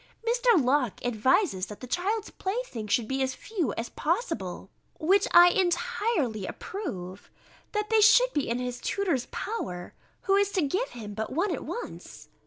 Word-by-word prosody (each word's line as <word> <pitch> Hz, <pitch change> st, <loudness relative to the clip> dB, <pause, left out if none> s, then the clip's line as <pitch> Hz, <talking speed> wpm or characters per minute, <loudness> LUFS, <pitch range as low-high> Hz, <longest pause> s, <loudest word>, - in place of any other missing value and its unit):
Mr. 480 Hz, -4 st, +4 dB
Locke 255 Hz, -4 st, +1 dB
advises, 245 Hz, -, +2 dB
that 210 Hz, -, -9 dB
the -, -, -7 dB
child's 395 Hz, -, -1 dB
playthings 375 Hz, -, -4 dB
should 235 Hz, -4 st, +2 dB
be 265 Hz, 0 st, -1 dB
as 260 Hz, 0 st, 0 dB
few 355 Hz, -, -2 dB
as 230 Hz, +1 st, -4 dB
possible, 360 Hz, +11 st, -2 dB, 0.3 s
which 385 Hz, +5 st, +3 dB
I 350 Hz, 0 st, +9 dB
entirely 350 Hz, -, 0 dB
approve: 190 Hz, -, -6 dB, 0.4 s
that 425 Hz, +1 st, -2 dB
they 440 Hz, -1 st, +5 dB
should -, -, +6 dB
be 290 Hz, -4 st, -1 dB
in 235 Hz, -, 0 dB
his 250 Hz, -1 st, -4 dB
tutor's 345 Hz, -11 st, -1 dB
power, 180 Hz, -, -5 dB, 0.3 s
who 390 Hz, -, +1 dB
is 405 Hz, 0 st, +2 dB
to 370 Hz, -, +2 dB
give 380 Hz, -, -1 dB
him 215 Hz, -4 st, -8 dB
but 220 Hz, +1 st, -4 dB
one 350 Hz, +5 st, +1 dB
at -, -, -4 dB
once. 480 Hz, -, -8 dB
335 Hz, 165 wpm, -28 LUFS, -, 0.4 s, I